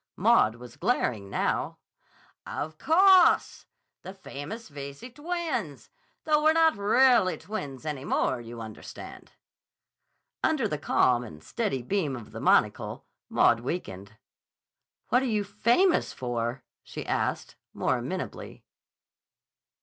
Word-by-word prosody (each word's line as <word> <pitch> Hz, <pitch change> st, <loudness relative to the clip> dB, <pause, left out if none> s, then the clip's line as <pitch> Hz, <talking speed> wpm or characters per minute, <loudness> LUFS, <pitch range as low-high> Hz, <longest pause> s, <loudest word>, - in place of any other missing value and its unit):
Maud 110 Hz, -, +4 dB
was 120 Hz, 0 st, -12 dB
glaring, 125 Hz, -, -1 dB
now. -, -, -1 dB, 0.7 s
"Of 155 Hz, +1 st, -5 dB
cawse! 370 Hz, +2 st, +4 dB, 0.3 s
The 190 Hz, -, -9 dB
famous 195 Hz, +5 st, -8 dB
Veyze 140 Hz, -, -9 dB
twins. 310 Hz, -, -4 dB, 0.3 s
Though 300 Hz, -1 st, +2 dB
we're 315 Hz, +1 st, +5 dB
not 325 Hz, -1 st, +4 dB
rahlly 215 Hz, -1 st, +3 dB
twins 145 Hz, -10 st, -6 dB
any 150 Hz, -4 st, -4 dB
more, 130 Hz, -3 st, 0 dB
you 115 Hz, 0 st, -9 dB
understand." 110 Hz, -1 st, -10 dB, 1.1 s
Under 275 Hz, -8 st, +2 dB
the 150 Hz, -7 st, -3 dB
calm 125 Hz, -3 st, +2 dB
and 80 Hz, -9 st, -11 dB
steady 195 Hz, -, -2 dB
beam 155 Hz, -3 st, -1 dB
of 115 Hz, -4 st, -10 dB
the -, -, -7 dB
monocle, -, -, +1 dB, 0.2 s
Maud 115 Hz, -, +4 dB
weakened. 110 Hz, -, -5 dB, 1.0 s
"What 250 Hz, -, +4 dB
are -, -, -1 dB
you 215 Hz, -4 st, 0 dB
famous 235 Hz, -, +2 dB
for?" 120 Hz, 0 st, -3 dB, 0.2 s
she -, -, -8 dB
asked, -, -, -2 dB, 0.2 s
more -, -, 0 dB
amenably. -, -, -6 dB
175 Hz, 120 wpm, -27 LUFS, -, 1.1 s, we're